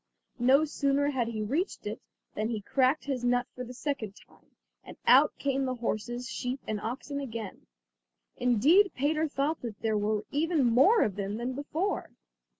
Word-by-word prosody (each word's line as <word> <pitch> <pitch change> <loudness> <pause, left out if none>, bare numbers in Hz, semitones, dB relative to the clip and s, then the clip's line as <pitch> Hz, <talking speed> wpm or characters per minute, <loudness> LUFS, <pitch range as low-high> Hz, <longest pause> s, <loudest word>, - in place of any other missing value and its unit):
No 265 +5 +5
sooner 285 -1 +1
had 250 -4 0
he 220 -2 -3
reached 295 - -2
it - - -5 0.3
than 215 +1 -2
he 220 -3 -3
cracked 260 +7 +1
his 265 -3 -2
nut 245 0 +2
for 250 - -6
the 250 - -8
second 245 -6 -4
time, - - -22 0.3
and - - -11
out - - +6
came 275 -1 0
the 255 -1 -2
horses, 240 +1 -3
sheep, 255 +1 -3
and 210 -1 -3
oxen 270 +5 -4
again. 230 -7 -7 0.7
Indeed 290 - +4
Peter 305 +4 +1
thought 295 +2 -1
that 230 -4 -6
there 220 -2 +1
were 210 0 0
even 305 -1 +1
more 270 - +5
of 200 -2 -2
them 200 +1 -3
than 245 +2 -3
before. 310 +8 -2
255 Hz, 170 wpm, -29 LUFS, 230-285 Hz, 0.7 s, out